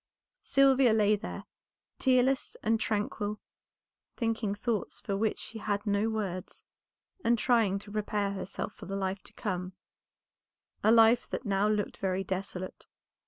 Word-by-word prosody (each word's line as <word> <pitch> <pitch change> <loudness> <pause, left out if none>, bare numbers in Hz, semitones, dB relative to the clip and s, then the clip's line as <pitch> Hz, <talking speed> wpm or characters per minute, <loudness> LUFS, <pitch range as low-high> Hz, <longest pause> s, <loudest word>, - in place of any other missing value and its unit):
Sylvia 270 -3 +5
lay 215 -1 +4
there, 210 +2 -6 0.6
tearless 260 0 +2
and 225 +1 +2
tranquil; 210 0 -2 0.8
thinking 225 -3 -1
thoughts 215 0 -2
for 200 - -3
which 215 +2 0
she 225 - -7
had 205 0 -2
no 205 +1 +1
words, 195 -5 -4 0.6
and 235 +1 +3
trying 225 -5 +3
to 205 +1 -9
prepare 210 -1 -1
herself 200 +1 -4
for - - -11
the 195 - -3
life 190 0 -2
to - - -14
come, 185 -4 -3 1.1
a 220 - +5
life 230 +1 +5
that - - -4
now 200 0 +2
looked 210 -1 -1
very 190 0 -1
desolate. 185 -1 -5
210 Hz, 140 wpm, -30 LUFS, 195-225 Hz, 1.1 s, Sylvia